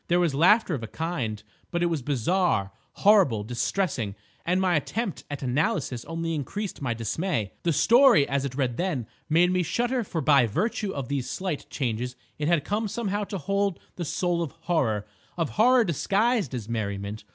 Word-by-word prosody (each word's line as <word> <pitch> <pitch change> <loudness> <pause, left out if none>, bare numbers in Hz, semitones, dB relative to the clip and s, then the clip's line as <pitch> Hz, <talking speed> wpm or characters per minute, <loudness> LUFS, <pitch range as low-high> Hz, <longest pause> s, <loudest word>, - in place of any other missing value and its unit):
There 175 +1 +3
was 170 -5 +2
laughter 180 +6 +4
of 135 - -2
a 115 - -5
kind, 120 -9 -3 0.3
but 175 0 -1
it - - +4
was 165 -4 0
bizarre, 140 - +1 0.2
horrible, 190 - +4
distressing; 120 - -1 0.3
and 180 +2 +1
my 185 -2 +2
attempt 195 - -2
at 145 -1 -5
analysis 130 -1 -1
only 165 0 -3
increased 175 - -4
my 120 -4 -1
dismay. 115 - -2
The 170 - +1
story, 235 - +5
as 140 0 0
it 135 -2 -4
read 130 -4 -1
then, 170 -10 -1 0.2
made 175 +3 +4
me 185 0 +2
shudder, 240 +7 0
for 175 -5 -4
by 140 -4 +4
virtue 205 - -1
of 135 -7 -4
these 135 -2 -2
slight 185 -3 -4
changes 125 -1 -2 0.2
it 150 - -1
had 170 -4 +2
come 215 +2 -1
somehow 205 -1 -2
to 200 - -5
hold 200 +1 -1 0.2
the 175 - -4
soul 175 +2 0
of 160 -3 -3
horror, 130 -12 0 0.3
of 165 -3 -1
horror 245 +3 +5
disguised 200 - +1
as 115 -4 -5
merriment. 105 -2 -3
165 Hz, 180 wpm, -26 LUFS, 125-190 Hz, 0.3 s, story